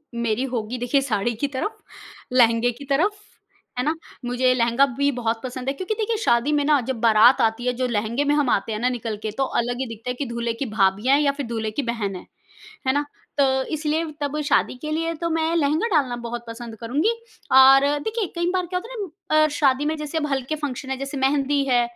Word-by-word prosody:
मेरी 235 +1 0
होगी 230 +1 -2
देखिए 245 +3 +1
साड़ी 235 -3 -1
की 285 +6 -1
तरफ, 280 +11 -4 0.6
लहंगे 235 -1 +4
की 265 +5 -11
तरफ, 290 +9 +2 0.7
है - - +1
ना? 310 +2 +1 0.3
मुझे 255 +1 +2
लहंगा 240 +2 +3
भी 280 0 +2
बहुत 230 -3 -2
पसंद 255 0 -6
है - - 0
क्योंकि 375 +9 -3
देखिए 445 0 -1
शादी 235 +5 +2
में 290 - +2
ना 295 -1 +4
जब 235 - -5
बारात 230 +2 +6
आती 225 +2 +1
है, 250 - +2
जो 255 +1 -1
लहंगे 230 +4 -1
में 290 +1 +2
हम 285 -4 +2
आते 200 +3 +1
हैं 215 - -3
ना 250 +2 +1
निकल 230 -4 -4
के 215 - -2
तो 270 - +2 0.2
अलग 245 +1 -3
ही 265 - -1
दिखता 230 +2 -7
है - - 0
कि 285 - -1
दूल्हे 235 -1 -2
की 250 +4 -4
भाभियाँ 200 +7 +3
हैं 300 - +2
या 280 - +3
फिर 280 0 -5
दूल्हे 225 -2 -3
की 280 +7 -2
बहन 205 -5 -3
है। 180 - -9 0.6
है 260 - +4
ना? 290 +1 0 0.3
तो 285 - +5 0.3
इसलिए 310 +1 0 0.2
तब 290 +1 -2
शादी - - +2
के 305 - -4
लिए 330 +1 -1
तो 335 - 0
मैं 325 0 0
लहंगा 310 +7 +1
डालना 275 -7 +2
बहुत 240 0 -5
पसंद 230 0 -8
करुँगी। 280 - +1 0.4
और 265 +1 +8 0.2
देखिए, 440 +5 -2
कई 345 0 0
बार 365 -1 0
क्या 360 +1 -2
होता 450 - -11
है - - -7 0.4
ना - - +6
अ, - - +3
शादी 285 -1 +2
में 310 +1 0
जैसे 300 +1 -4
अब 300 -2 0
हल्के 270 +2 -1
फंक्शन 285 -3 -5
है, 265 - -1
जैसे 275 +1 -5
मेहंदी 275 +1 +1
है, 245 -1 +4
265 Hz, 230 wpm, -23 LUFS, 235-295 Hz, 0.7 s, और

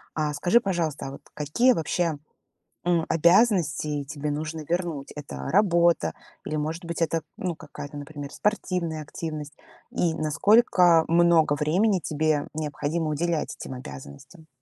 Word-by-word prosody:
А 150 -1 0
скажи, 180 +10 +3
пожалуйста, 170 - -2
а - - -6
вот 140 - -10
какие 150 - +2
вообще, 165 -3 -1 0.7
м, 175 -2 +2
обязанности 165 -5 +3
тебе 145 +1 -4
нужно 155 +2 -4
вернуть? 170 -5 -2
Это 150 -1 -7 0.2
работа 170 - +3 0.3
или, 155 - -3
может 155 +4 -3
быть, 170 0 -4
это, 165 0 +1 0.2
ну, 180 -3 -3
какая-то, 145 -1 -9
например, 145 -1 -7
спортивная 180 -7 -1
активность? 150 -1 -6 0.4
И 165 -2 0
насколько 175 - +4
много 170 -2 +4
времени 180 +8 +2
тебе 155 -1 0
необходимо 155 +1 -2
уделять 165 +1 -1
этим - - -7
обязанностям? 125 - -11
160 Hz, 130 wpm, -26 LUFS, 150-175 Hz, 0.7 s, насколько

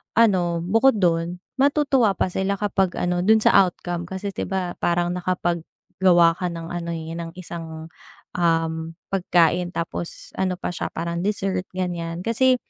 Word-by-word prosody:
ano, 180 -7 +3
bukod 225 +8 +4
dun, 170 0 +1 0.2
matutuwa 275 -6 +3
pa - - +1
sila 190 +2 -1
kapag 195 -3 +1
ano 180 0 0
dun 220 +1 +5
sa - - +5
outcome. 175 -2 +1
Kasi 190 +2 -4
di 195 - -4
ba 185 -2 -3
parang 175 0 +1
nakapag-gawa 175 -1 +1
ka 180 - -2
ng 165 0 -6
ano 170 -1 -4
ng 165 +1 -6
isang, 165 -3 -7 0.5
um, 165 -1 0 0.2
pagkain. 175 -1 +2
Tapos 170 0 -5
ano 185 -1 +1
pa - - -2
siya 175 - -3
parang 170 +1 -3
dessert, 195 -3 -1
ganyan. 175 -2 -3
Kasi 255 +4 +3
175 Hz, 145 wpm, -23 LUFS, 170-190 Hz, 0.5 s, dun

